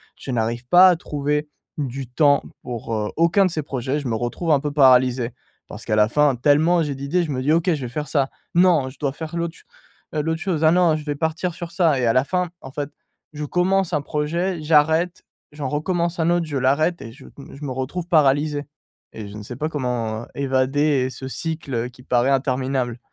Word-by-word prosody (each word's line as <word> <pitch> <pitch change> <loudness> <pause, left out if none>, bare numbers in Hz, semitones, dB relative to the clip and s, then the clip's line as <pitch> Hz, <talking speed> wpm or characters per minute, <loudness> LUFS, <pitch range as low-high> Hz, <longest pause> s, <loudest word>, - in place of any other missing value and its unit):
je - - -11
n'arrive 120 0 -2
pas 180 +6 +8
à 180 - +4
trouver 150 -2 -2 0.3
du 135 -1 -3
temps 140 +3 +3 0.2
pour, 120 -2 -5
heu, 105 -1 -1
aucun 170 +4 +4
de - - -2
ces 155 -2 -2
projets, 135 +1 -2
je 145 - -5
me 115 - -1
retrouve 120 +9 -2
un 145 - +5
peu 145 +1 -3
paralysé. 130 -3 +4 0.4
Parce - - -9
qu'à 110 - 0
la 105 0 +4
fin 145 +1 +3
tellement 155 +7 +3
j'ai 145 -2 -2
d'idées 140 +6 -1
je 155 - -4
me 130 -2 -2
dis: 140 +4 +1
«OK, 170 +2 +2
je 150 - -3
vais 125 - -3
faire 150 +5 -4
ça, 140 -3 +1 0.2
non 170 -6 +4
je 130 - -16
dois 140 -2 -1
faire 160 +2 -7
l'autre 170 -1 -3
ch - - -19 0.5
heu, 155 - 0
l'autre 160 +1 -2
chose, 165 -4 -1
ah 155 - +6
non 175 -2 +4
je 155 - -5
vais 145 -1 -2
partir 160 +3 -2
sur 175 -2 -7
ça» 165 -5 +2
et 125 - +1
à 115 - +3
la 130 - +3
fin 180 +4 -1
en 135 - -9
fait 145 0 -5 0.4
je 150 0 -5
commence 185 +3 +1
un 150 - +1
projet, 165 +5 -2
j'arrête, 160 +3 +2 0.3
j'en 145 -3 -4
recommence 170 +3 -1
un 165 +1 +2
autre, 175 -1 +2
je 150 -3 -3
l'arrête 145 +7 +1
et 115 - -8
je 135 +2 -15
me 140 - -11
je 145 +2 -8
me 135 - -4
retrouve 130 +7 -4
paralysé 145 -2 +2 0.5
et 110 -2 -7
je 100 - -10
ne - - -7
sais 120 +4 -8
pas 150 +5 -2
comment 120 -6 -3
évader 135 0 +1
ce 130 0 -8
cycle, 155 +2 -5
heu, 115 0 -1
qui 125 0 -17
paraît 125 0 +2
interminable. 130 -2 0
145 Hz, 225 wpm, -22 LUFS, 130-160 Hz, 0.5 s, pas